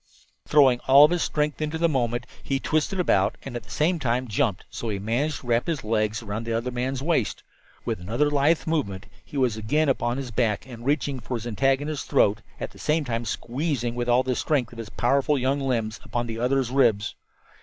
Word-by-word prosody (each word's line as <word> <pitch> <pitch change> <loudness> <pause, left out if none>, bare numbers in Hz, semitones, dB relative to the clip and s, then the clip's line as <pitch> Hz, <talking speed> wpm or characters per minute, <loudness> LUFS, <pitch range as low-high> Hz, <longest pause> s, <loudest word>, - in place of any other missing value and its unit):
Throwing 135 -5 +5
all 140 +3 +9
his 175 -1 0
strength 150 0 -1
into 155 +1 -1
the 170 +1 +3
movement, 120 -4 -1 0.2
he 135 -1 -1
twisted 155 +7 0
about 180 - +2
and 135 -3 -7
at 120 - -3
the 120 - -20
same 165 +3 +1
time 125 -1 0
jumped, 100 -2 0
so 115 - -5
that 110 - -1
he - - -2
managed 125 +9 -1
to - - -15
wrap 120 +5 +1
his 165 -4 -2
legs 110 0 0
about 105 +1 -4
the 115 0 -3
other 115 +3 -1
man's 130 +2 -2
waist. 155 -9 0 0.4
With - - -2
another 120 +11 0
lithe 145 +3 +2
movement 130 -13 -1 0.2
he 145 - -8
was 125 -5 +1
again 145 +8 +1
upon 120 -2 0
his 135 -3 -5
back 110 -3 0
and 120 -3 -10
reaching 140 -2 0
for 125 +1 -4
his 115 -1 -5
antagonist's 135 +5 0
throat, 100 0 +3 0.2
at - - -5
the - - -16
same 155 0 +1
time 115 -1 -2
squeezing 125 -1 -2
with 120 0 -2
all 125 +2 +4
the 130 -1 -1
strength 135 -4 0
of 115 - -11
his 110 -2 -6
powerful 140 +6 +1
young 135 +2 +1
limbs 120 -5 -1
upon 120 0 -2
the 115 -1 -5
other's 125 0 +1
ribs. 115 -6 +2
125 Hz, 215 wpm, -25 LUFS, 115-145 Hz, 0.4 s, all